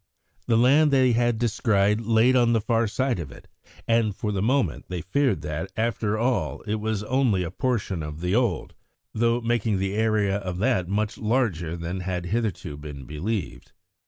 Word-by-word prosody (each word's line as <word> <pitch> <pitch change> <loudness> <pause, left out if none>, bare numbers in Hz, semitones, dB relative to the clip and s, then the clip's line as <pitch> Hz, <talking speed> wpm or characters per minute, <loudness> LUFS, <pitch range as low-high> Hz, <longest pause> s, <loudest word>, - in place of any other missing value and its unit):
The 115 - +3
land 140 +6 +5
they 130 -3 +4
had 120 0 +2
descried 105 -2 +1
lay 115 +3 +3
on 120 -2 +4
the 115 - +3
far 115 +1 +1
side 130 +1 -1
of 80 - -6
it, - - -14 0.4
and 115 -3 +2
for 105 - -3
the 100 -2 -1
moment 120 - 0
they 90 -3 -5
feared 110 - 0
that, 75 +5 -4
after 110 -1 0
all, 120 -1 -1
it 110 0 -3
was 110 -1 -2
only 120 -5 +1
a 85 - -5
portion 105 - -1
of 75 0 -6
the 90 +2 -1
old, 115 -7 0 0.4
though 115 +2 +1
making 115 -3 0
the 95 +1 -1
area 105 -2 +1
of 90 -3 -5
that 100 -4 +1
much 105 +1 -1
larger 105 -9 0
than 85 +2 -4
had 90 -1 -3
hitherto 105 -10 -2
been 75 -3 -9
believed. 90 - -4
110 Hz, 180 wpm, -25 LUFS, 95-120 Hz, 0.4 s, land